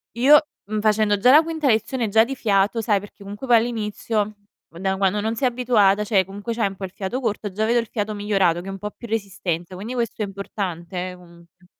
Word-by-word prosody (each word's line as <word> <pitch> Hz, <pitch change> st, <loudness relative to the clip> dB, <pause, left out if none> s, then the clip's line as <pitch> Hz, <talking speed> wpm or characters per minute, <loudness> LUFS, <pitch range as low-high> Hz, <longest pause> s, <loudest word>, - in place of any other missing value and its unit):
Io, 280 Hz, +5 st, +7 dB, 0.3 s
mhmm, 215 Hz, +1 st, -3 dB
facendo 210 Hz, -1 st, +2 dB
già 250 Hz, +6 st, +5 dB
la 305 Hz, +3 st, +8 dB
quinta 320 Hz, -3 st, -2 dB
lezione, 230 Hz, +1 st, +1 dB
già 220 Hz, +2 st, +5 dB
di 270 Hz, +3 st, -4 dB
fiato 205 Hz, 0 st, +1 dB
sai 205 Hz, -2 st, +2 dB
perché 205 Hz, 0 st, -13 dB
comunque 205 Hz, +6 st, -8 dB
poi 240 Hz, -, +6 dB
all'inizio, 215 Hz, -2 st, -2 dB, 0.3 s
da 190 Hz, +3 st, -2 dB
quando 195 Hz, +1 st, +1 dB
non 220 Hz, +2 st, -1 dB
sei 255 Hz, +3 st, +1 dB
abituata, 220 Hz, -5 st, +3 dB
cioè 200 Hz, -3 st, +2 dB
comunque 205 Hz, +5 st, -6 dB
c'hai 225 Hz, -3 st, +1 dB
un 195 Hz, -, -7 dB
po' 195 Hz, -, -10 dB
il 185 Hz, -, -9 dB
fiato 200 Hz, +7 st, -4 dB
corto, 210 Hz, -4 st, -3 dB
già 215 Hz, +3 st, -1 dB
vedo 240 Hz, +1 st, +3 dB
il 230 Hz, -, -3 dB
fiato 215 Hz, -1 st, -3 dB
migliorato, 195 Hz, -5 st, +1 dB
che 190 Hz, -, -11 dB
è -, -, -4 dB
un 195 Hz, -, -6 dB
po' 210 Hz, +1 st, -6 dB
più 235 Hz, -, -11 dB
resistente, 190 Hz, -5 st, -3 dB
quindi 210 Hz, +7 st, -6 dB
questo 230 Hz, -2 st, -2 dB
è -, -, +1 dB
importante 185 Hz, -2 st, -5 dB
eh, -, -, -10 dB
comunque. 175 Hz, +1 st, -19 dB
210 Hz, 230 wpm, -22 LUFS, 195-230 Hz, 0.3 s, la